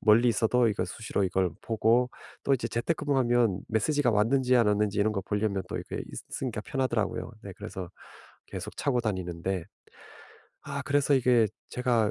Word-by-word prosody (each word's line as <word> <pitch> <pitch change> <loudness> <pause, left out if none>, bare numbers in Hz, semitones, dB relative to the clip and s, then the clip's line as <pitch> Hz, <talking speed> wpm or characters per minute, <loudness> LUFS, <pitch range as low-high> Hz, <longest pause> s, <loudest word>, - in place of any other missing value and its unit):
멀리 115 +3 +5
있어도 115 +2 +3
이거 100 -4 0
수시로 100 +2 -3
이걸 95 -1 +1
보고 115 +3 +2 0.3
또 140 - +2
이제 120 -2 -2
재택근무하면 120 - +1
메시지가 125 +4 +2
왔는지 125 +4 +3
안 115 -3 +4
왔는지 105 0 +1
이런 105 +1 +3
거 100 - -1
보려면 105 -1 -1
또 - - -4
이게 - - -5 0.3
있으니까 120 -5 -3
편하더라고요. 115 -5 -1
네 100 - -7
그래서 90 -2 -6 0.6
계속 - - -7
차고 130 -4 +1
다니는데. 95 -3 -2 1.0
아 140 -1 -4
그래서 145 0 +3
이게 125 -3 +4 0.2
제가 120 -4 +1
115 Hz, 360 characters per minute, -28 LUFS, 105-125 Hz, 1.0 s, 멀리